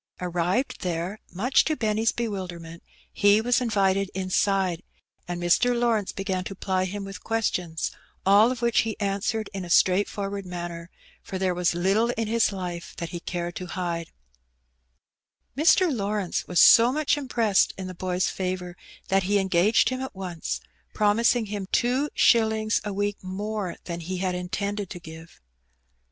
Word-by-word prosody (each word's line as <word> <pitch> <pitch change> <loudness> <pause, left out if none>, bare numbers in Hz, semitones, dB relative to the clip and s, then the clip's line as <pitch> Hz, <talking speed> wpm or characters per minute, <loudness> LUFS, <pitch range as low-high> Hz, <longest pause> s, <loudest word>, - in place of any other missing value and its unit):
Arrived 180 +7 -1
there, 180 +3 -3
much 240 +9 +2
to 310 - 0
Benny's 220 -2 +1
bewilderment, 180 -7 -5 0.3
he 205 +1 +5
was 245 +3 +2
invited 195 -4 +1
inside, 190 -1 +1 0.5
and 175 0 -4
Mr, 240 +8 +3
Lawrence 225 -4 +1
began 190 -2 -3
to 195 - -6
ply 185 -1 -1
him 200 +2 -5
with 195 -1 -9
questions, 180 -8 -1 0.3
all 205 +5 +6
of 250 -1 -5
which 235 -1 +3
he 220 -1 -1
answered 200 +2 -1
in 195 -1 -4
a 175 - -8
straightforward 200 +2 +2
manner, 175 -1 -6 0.3
for 190 - -6
there 185 -1 0
was 175 -1 0
little 195 +7 +2
in 225 -1 -1
his 230 0 +2
life 180 -3 -6
that 170 - -4
he 175 - -5
cared 175 0 -4
to 180 - -6
hide, 170 -2 -3 1.5
Mr. 320 +1 +4
Lawrence 200 -3 -2
was 180 -2 +1
so 235 +7 +8
much 300 +1 +1
impressed 235 -8 +2
in 190 - -5
the 185 - -6
boy's 180 0 -1
favour 180 -1 -3 0.3
that 195 0 +3
he 205 - +4
engaged 190 +2 +3
him 255 0 -3
at 265 -5 -6
once, 180 -4 -4 0.3
promising 225 +3 +3
him 200 -2 -5
two 255 +5 +1
shillings 220 -2 +3
a 210 - -3
week 205 +1 -1
more 200 0 -4
than 170 -1 -5
he 180 +2 -4
had 185 0 -1
intended 200 +2 -3
to 175 - -7
give. 160 0 -12
195 Hz, 160 wpm, -25 LUFS, 180-220 Hz, 1.5 s, so